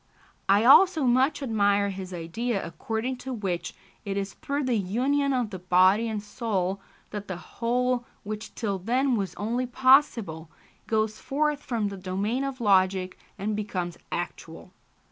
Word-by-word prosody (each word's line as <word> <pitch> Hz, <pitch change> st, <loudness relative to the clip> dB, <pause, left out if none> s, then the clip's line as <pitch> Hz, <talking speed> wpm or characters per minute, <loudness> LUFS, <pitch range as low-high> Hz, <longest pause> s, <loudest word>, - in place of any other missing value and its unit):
I 200 Hz, +3 st, +5 dB
also 325 Hz, +4 st, +7 dB
much 260 Hz, +4 st, +2 dB
admire 205 Hz, -4 st, +2 dB
his 190 Hz, -1 st, -7 dB
idea 195 Hz, +6 st, -3 dB
according 225 Hz, +9 st, -3 dB
to 265 Hz, +1 st, -7 dB
which 195 Hz, -7 st, -3 dB, 0.3 s
it 200 Hz, -1 st, -3 dB
is 195 Hz, 0 st, -3 dB
through 285 Hz, +1 st, -3 dB
the 255 Hz, -2 st, 0 dB
union 260 Hz, +8 st, +1 dB
of 245 Hz, -5 st, 0 dB
the 185 Hz, -, -6 dB
body 185 Hz, +5 st, +4 dB
and 215 Hz, -2 st, -3 dB
soul 195 Hz, -4 st, -2 dB, 0.3 s
that 205 Hz, -1 st, -6 dB
the 185 Hz, -, -4 dB
whole, 245 Hz, +5 st, -1 dB, 0.2 s
which 215 Hz, +1 st, -6 dB
till 200 Hz, -4 st, -2 dB
then 250 Hz, +6 st, +1 dB
was 195 Hz, -4 st, -3 dB
only 240 Hz, +5 st, -2 dB
possible, 240 Hz, -, +3 dB, 0.4 s
goes 220 Hz, -1 st, 0 dB
forth 295 Hz, +1 st, 0 dB
from 225 Hz, -7 st, -1 dB
the 200 Hz, -, -7 dB
domain 195 Hz, +7 st, -2 dB
of 275 Hz, -1 st, -4 dB
logic 190 Hz, -3 st, +2 dB, 0.2 s
and 210 Hz, +2 st, -2 dB
becomes 185 Hz, -5 st, -4 dB
actual. 175 Hz, +1 st, -6 dB
215 Hz, 150 wpm, -27 LUFS, 190-250 Hz, 0.4 s, also